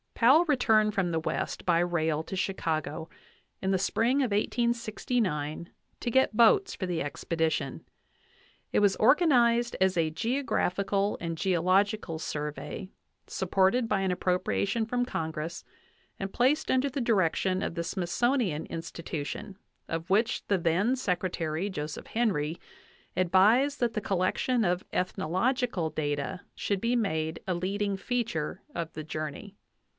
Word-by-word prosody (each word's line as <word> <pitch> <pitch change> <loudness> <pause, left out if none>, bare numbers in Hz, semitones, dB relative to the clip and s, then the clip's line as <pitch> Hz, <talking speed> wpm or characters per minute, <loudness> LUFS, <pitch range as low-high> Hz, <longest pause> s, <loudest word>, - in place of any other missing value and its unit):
Powell 275 +9 +6
returned 220 -8 +3
from 195 -3 +1
the 165 -1 0
West 160 - -3
by 170 -2 +3
rail 160 -3 +1
to 190 - -6
Chicago 160 -4 -2 0.5
in 190 - -1
the 190 - +2
spring 230 +7 +1
of 255 - +1
1869 210 - -1 0.3
to 240 - -2
get 265 -3 +3
boats 380 - +5
for 190 - -3
the 175 -2 -2
expedition. 160 +2 -2 0.9
It - - +3
was 205 -2 +4
organ 300 +8 +5
ized 240 -1 +3
as 190 -1 +3
a 160 -2 +2
geographical 200 - 0
and 165 -2 -4
geological 185 0 +1
survey, 150 +4 -5 0.4
supported 195 +6 +2
by 200 -3 +1
an 190 -1 +1
appropriation 190 +4 0
from 245 +2 0
Congress 160 -4 -4 0.6
and 195 0 -4
placed 260 +5 +2
under 260 +2 +2
the 270 +1 -3
direction 190 -4 +1
of - - -2
the 170 0 -2
Smithsonian 185 - 0
Institution, 165 +4 -6 0.3
of 165 +1 -4
which 220 +4 +2
the 200 - +2
then 180 +9 +2
Secretary, 180 -6 -1
Joseph 150 -5 -5
Henry, 175 -9 0 0.6
advised 210 +11 +4
that 235 -2 +1
the 215 - -2
collection 200 +6 +1
of 180 0 0
ethnological 190 - 0
data 145 +4 -2
should 200 -2 -1
be 235 +1 +1
made 160 -8 -1
a 185 - +1
leading 200 +3 -1
feature 210 -7 -2
of 165 -1 -4
the 155 - -6
journey. 155 +6 -6
190 Hz, 135 wpm, -29 LUFS, 165-230 Hz, 0.9 s, Powell